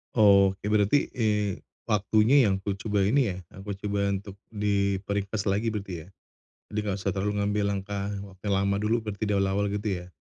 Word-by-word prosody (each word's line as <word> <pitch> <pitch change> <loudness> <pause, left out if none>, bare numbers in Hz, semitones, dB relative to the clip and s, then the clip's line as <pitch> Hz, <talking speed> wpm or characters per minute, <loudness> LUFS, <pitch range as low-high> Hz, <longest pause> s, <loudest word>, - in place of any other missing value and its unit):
Oh 100 -3 +6
oke 95 - -12
berarti, 105 +6 +3
eee, 105 -4 0 0.2
waktunya 110 +6 +4
yang 95 -1 +1
kucoba 100 +2 -2
ini 125 -1 +3
ya, 90 - -6 0.2
aku 100 +2 -6
coba 100 -1 0
untuk 100 0 -5 0.2
diperingkas 100 0 -1
lagi 105 +4 +1
berarti 95 -6 -5
ya? - - -17 0.7
Jadi 105 - -2
nggak 100 - 0
usah 100 0 -1
terlalu 100 +2 -1
ngambil 105 0 0
langkah 100 0 -3 0.2
wa 100 - -12
yang 100 0 0
lama 100 0 +1
dulu, 110 +2 0
berarti 105 0 -3
dari 100 -1 +2
awal 100 +1 0
gitu 105 +1 -2
ya? 90 - -11
100 Hz, 180 wpm, -27 LUFS, 100-105 Hz, 0.7 s, Oh